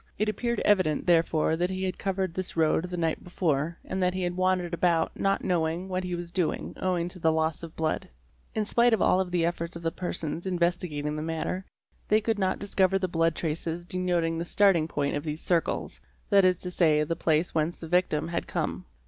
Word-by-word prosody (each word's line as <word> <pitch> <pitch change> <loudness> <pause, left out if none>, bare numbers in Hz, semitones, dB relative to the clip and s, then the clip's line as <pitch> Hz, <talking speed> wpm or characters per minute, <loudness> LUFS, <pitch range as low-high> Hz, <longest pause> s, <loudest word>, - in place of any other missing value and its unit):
It 215 +1 +1
appeared 235 +2 -1
evident 185 -7 +2
therefore 165 -2 +3
that 175 +2 0
he 190 0 -3
had 185 -1 -2
covered 190 -2 -1
this 185 -1 -4
road 160 +1 +2
the 180 0 -5
night 165 -2 -1
before 165 -2 -1
and 190 - -3
that 180 0 +1
he 185 - -1
had 175 0 -1
wandered 185 -1 +1
about 170 -1 +2
not 195 0 0
knowing 170 0 0
what 185 0 -1
he 180 -1 -2
was 175 0 -6
doing 180 -3 -1
owing 180 -2 0
to 180 - -6
the 160 -1 +3
loss 160 -1 0
of 165 -1 -9
blood®®. 160 +4 -1 0.5
In 215 -1 0
spite 235 +2 +4
of 215 - -5
all 185 +1 +4
the 180 -2 0
efforts 170 0 -2
of 170 - -8
the 165 - 0
persons 170 -1 -4
investi 175 -1 0
gating 150 0 -3
the - - -3
matter 165 +4 -3 0.4
they 215 - +4
could 220 -1 -1
not 190 -1 +1
discover 195 -1 +2
the 185 -1 -1
blood 165 -1 +1
traces 165 +1 -3
denoting 175 -3 0
the - - -1
starting 180 -4 +3
point 145 -3 -1
of 145 - -3
these 155 0 -4
circles, 170 -2 -1 0.3
that 200 -1 +6
is 185 -1 +4
to 180 +1 -5
say, 155 -4 +3
the 165 +2 -2
place 160 0 +1
whence 160 +2 0
the 165 - -7
victim 170 -2 +1
had 170 - -3
come. - - -3
175 Hz, 215 wpm, -27 LUFS, 165-185 Hz, 0.5 s, that